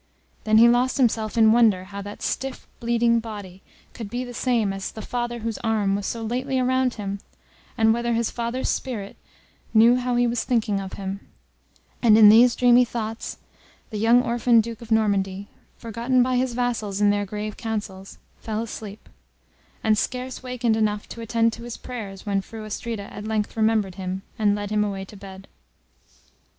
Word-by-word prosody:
Then 215 0 +4
he 230 +2 +8
lost 245 +3 +2
himself 225 -4 +1
in 220 -1 +6
wonder 220 -5 +4
how 200 +1 -8
that 205 +1 -9
stiff 270 0 -3
bleeding 235 0 +2
body 205 -5 -8 0.3
could 225 -4 -7
be 245 +3 -3
the 245 -1 -8
same 230 -5 0
as 195 0 -5
the 220 - -8
father 240 -1 -3
whose 225 0 -3
arm 215 -4 +1
was 200 -1 -3
so 230 -1 -4
lately 255 +4 -2
around 255 0 +1
him, 200 -2 -4 0.6
and 220 -1 +4
whether 235 0 -1
his 230 0 0
father's 240 +2 -3
spirit 210 -6 -3 0.6
knew 230 +3 +6
how 250 -1 -1
he 245 0 +3
was 240 0 0
thinking 220 -5 0
of 190 -1 -7
him; 195 0 -5 0.8
and 220 -3 +6
in 215 -2 +9
these 235 +3 +7
dreamy 245 0 +5
thoughts, 225 -2 -5 0.5
the 215 - -4
young 235 +3 +5
orphan 235 -1 +3
Duke 225 0 -3
of 230 - -11
Normandy, 200 -3 +1 0.3
forgotten 235 +2 +1
by 255 0 0
his 250 -1 0
vassals 230 -5 -1
in 205 -1 +4
their 205 0 -1
grave 210 +1 -5
councils, 205 -4 -5 0.2
fell 220 0 -3
asleep, 215 -2 -8 0.8
and 220 -1 +4
scarce 255 0 -3
wakened 250 -3 0
enough 210 -1 0
to 230 - -8
attend 230 0 +1
to - - -9
his 240 -1 -7
prayers, 210 -6 -8
when 200 -1 0
Fru 220 +2 -9
Astrida 215 -1 -5
at 210 - -7
length 215 -1 -2
remembered 220 -3 +1
him, 185 +1 -4 0.2
and 205 -2 +3
led 205 0 -5
him 210 0 +2
away 195 -2 -3
to 205 - -14
bed. 195 -1 -11
225 Hz, 180 wpm, -24 LUFS, 205-240 Hz, 0.8 s, in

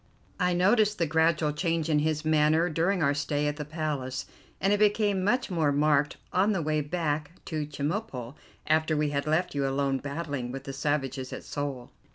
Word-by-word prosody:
I 180 0 +2
noticed 210 +4 +3
the 170 - +1
gradual 160 -1 +2
change 165 0 0
in 150 -2 +3
his 155 0 -1
manner 155 +2 +3
during 175 +3 +1
our 140 0 +3
stay 145 +1 -1
at 145 0 -2
the 150 - -3
Palace, 145 -4 -3 0.3
and 195 +2 +2
it 205 - +1
became 205 -2 +2
much 240 +2 +1
more 160 -5 +2
marked 150 0 +2 0.2
on 200 +4 +3
the 190 - 0
way 155 0 +1
back 150 -1 -2
to 155 -2 -3
Chemulpo, 145 - -3 0.3
after 155 0 +2
we 150 -1 +1
had 140 +1 -2
left 160 +4 +1
you 140 -1 0
alone 135 0 0
battling 140 -4 -4
with 135 +1 -6
the 135 - -6
savages 135 -2 -2
of - - -6
Seoul. 140 -4 -5
150 Hz, 190 wpm, -28 LUFS, 145-170 Hz, 0.3 s, noticed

